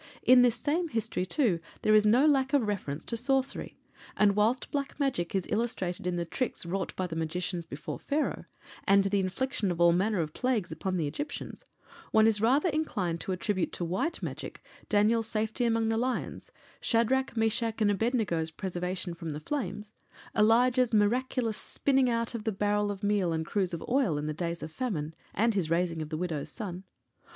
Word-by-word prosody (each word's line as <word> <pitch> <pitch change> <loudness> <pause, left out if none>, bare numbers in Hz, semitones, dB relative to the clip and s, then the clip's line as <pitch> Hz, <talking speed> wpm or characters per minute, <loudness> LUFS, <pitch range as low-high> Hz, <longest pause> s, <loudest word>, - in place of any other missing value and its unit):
In 255 0 +7
this 245 -2 +4
same 330 +7 0
history, 225 - -2
too, 215 - +2 0.2
there 215 - +4
is 215 0 +6
no 245 +7 +5
lack 270 -2 +3
of 265 -7 +3
reference 160 -8 -3
to 235 - -3
sorcery; 265 +3 -1 0.4
and 205 -1 +4
whilst 225 +5 +1
Black 280 0 -3
Magic 245 -12 -1
is 190 - 0
illustrated 190 -6 -1
in 180 - 0
the 170 -1 -1
tricks 245 +2 -3
wrought 190 +2 -2
by 185 - -1
the 165 -2 -5
magicians 165 +1 -3
before 150 -1 -6
Pharaoh, 295 +2 -1 0.4
and 195 0 +5
the 195 +1 +1
infliction 200 +3 -1
of 175 -1 -2
all 170 0 +6
manner 195 +3 +1
of 155 -2 -2
plagues 240 -9 -1
upon 185 +4 -2
the 165 - 0
Egyptians, 285 - -5 0.4
one 220 0 +5
is 220 -2 +3
rather 270 +10 +3
inclined 205 - -1
to - - -3
attribute 185 0 -1
to 175 - -2
White 195 - -2
Magic - - -6 0.3
Daniel's 220 +2 +3
safety 220 +3 -1
among 225 -1 +2
the 225 - +1
lions; 250 +2 -3 0.3
Shadrach, 240 +2 +1
Meshach, 225 0 +1
and 210 -2 +3
Abed 225 +6 +1
nego's 170 -8 0
preservation 180 +1 -3
from 165 -1 -6
the 150 -1 -4
flames; 210 - -4 0.4
Elijah's 240 +3 +4
miraculous 230 +1 +1
spinning 270 -2 +1
out 230 0 -1
of 230 -2 -4
the 220 - 0
barrel 205 +1 0
of 200 0 -5
meal 205 -4 +2
and 160 0 -1
cruse 190 +1 0
of 170 - -5
oil, 245 - +2
in 145 - -3
the 155 - -2
days 170 +1 -3
of 160 - -6
famine, 165 - -3 0.2
and 230 +2 +3
his 185 -6 -1
raising 165 -1 0
of 155 - -5
the 155 - -3
widow's 160 -4 -3
son. 190 -4 -6
210 Hz, 190 wpm, -29 LUFS, 175-240 Hz, 0.4 s, In